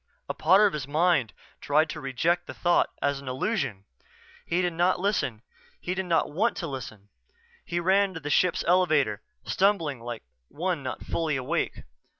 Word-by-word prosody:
A - - -2
part 190 +6 +5
of 200 - +2
his 145 -4 -4
mind 150 - +2 0.3
tried 155 +2 +2
to 155 - -7
reject 160 +7 0
the - - -8
thought 175 0 +2
as 140 -1 +1
an 140 - -12
illusion. 130 - -2 0.6
He 175 - +1
did 175 -1 0
not 175 +2 +2
listen 180 - -1 0.4
he 180 - -3
did 190 0 -3
not 165 -2 +1
want 215 +10 +1
to 175 - -3
listen. 110 -8 -7 0.5
He 170 0 -2
ran 190 +2 +2
to - - -4
the 150 -1 -4
ship's 180 +4 +2
elevator, 155 - +3 0.2
stumbling 175 - +1
like 120 -1 -6 0.2
one 175 - -2
not 130 -1 -5
fully 160 -3 -1
awake. 135 +6 -2
160 Hz, 170 wpm, -27 LUFS, 135-180 Hz, 0.6 s, part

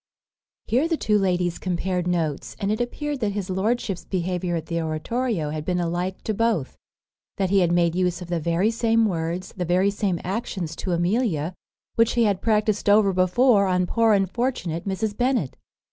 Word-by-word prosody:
Here 260 +8 +2
the 330 -1 0
two 210 -6 +2
ladies 180 -3 0
compared 180 0 -2
notes; 165 -5 -2
and 200 -1 0
it 215 +3 0
appeared 290 +4 -3
that 210 -4 -1
his 195 -2 -3
lordship's 195 0 -1
behaviour 180 -1 -2
at 160 -2 -3
the 170 0 -2
oratorio 160 +2 -2
had 155 0 -4
been 180 +2 -1
alike 175 +2 -2
to 215 - -1
both; 220 - 0 0.6
that 190 -2 0
he 200 - +5
had 175 -2 +2
made 170 -1 +3
use 180 -1 0
of 180 - -8
the 175 -1 -1
very 170 +7 +1
same 230 -1 +2
words, 175 -1 -2
the 185 - -2
very 180 +3 +2
same 195 -4 -1
actions 190 -4 -3
to 185 - -2
Amelia, 175 - 0 0.4
which 230 0 +4
he 235 - +3
had 200 -4 +1
practised 215 -2 +1
over 205 -1 +5
before 200 +3 +4
on 180 -1 +2
poor 225 +3 +3
unfortunate 195 -3 -1
Mrs. 205 +2 -2
Bennet. 245 - 0
190 Hz, 180 wpm, -24 LUFS, 175-220 Hz, 0.6 s, he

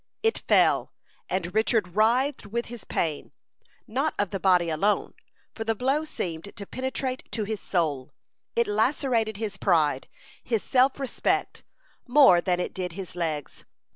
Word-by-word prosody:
It 450 0 +2
fell, - - +4 0.4
and 180 -1 -2
Richard 220 -3 +2
writhed 240 +3 +2
with 235 +3 -3
the 240 -3 -9
pain, 155 -3 -2 0.5
not 265 +7 -1
of 205 - 0
the 195 - -3
body 180 -2 +4
alone, 200 +7 +1 0.4
for 225 - -4
the 225 0 0
blow 270 +7 0
seemed 175 - -5
to 200 - -7
penetrate 260 +2 -4
to 220 - -1
his 210 0 -4
soul. 150 -7 -1 0.4
It 235 - +3
lacerated 225 0 +1
his 210 -2 -4
pride, 155 -9 +2 0.4
his 225 -4 -1
self 260 +2 +3
respect, 270 -3 -1 0.5
more 245 -9 +7
than 180 -1 0
it 180 - -3
did 180 -2 -4
his 185 -1 -7
legs. 160 -4 -3
210 Hz, 150 wpm, -26 LUFS, 180-250 Hz, 0.5 s, more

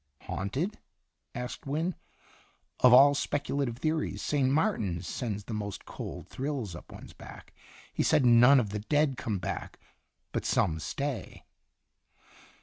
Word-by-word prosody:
" 70 - -37
Haunted?" 140 - -3 0.6
asked 125 +2 -6
Wynne. 160 +6 -1 0.5
" - - -36
Of 125 - +8
all 135 +3 +8
spec 145 0 -1
ulative 135 -5 -1
theories, 155 +3 -1
St. 140 -3 +1
Martin's 110 - 0
sends 105 -2 -4
the 110 - -7
most 105 -2 -5
cold - - -7
thrills 130 - -4
up - - -12
one's - - -11
back. - - -13 0.4
He - - 0
said 140 - +3
none 125 +3 +7
of 105 -5 -2
the 105 - -3
dead 145 +5 +1
come 110 -4 -2
back, 90 - -5 0.5
but - - -2
some 80 -1 +1
stay." 140 - -4
125 Hz, 145 wpm, -29 LUFS, 105-145 Hz, 0.6 s, Of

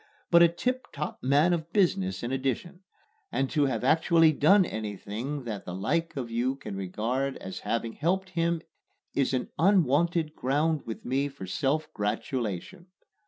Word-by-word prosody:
but 170 0 +7
a 170 - +9
tip 250 +10 -2
top 150 +1 -5
man 145 +7 +4
of 165 -1 -3
business 95 - +1
in 120 - -2
addition; 135 +7 -2 0.5
and 135 - 0
to 145 -3 +3
have 120 -4 -2
actually 160 +3 +5
done 185 +6 +5
anything 110 - -4
that 110 -4 -5
the 90 - -6
like 160 - -1
of 120 -3 -4
you 125 +3 0
can 120 -7 -7
regard 115 +8 -2
as 95 0 -7
having 115 0 -2
helped 190 +4 -1
him 170 -1 0 0.5
is 140 - +1
an 130 -2 -2
unwonted 170 -3 +3
ground 150 +4 +1
with 110 - -6
me 135 +3 +1
for 140 -8 -8
self 140 +11 0
gratulation. 115 - -3
140 Hz, 160 wpm, -28 LUFS, 115-165 Hz, 0.5 s, a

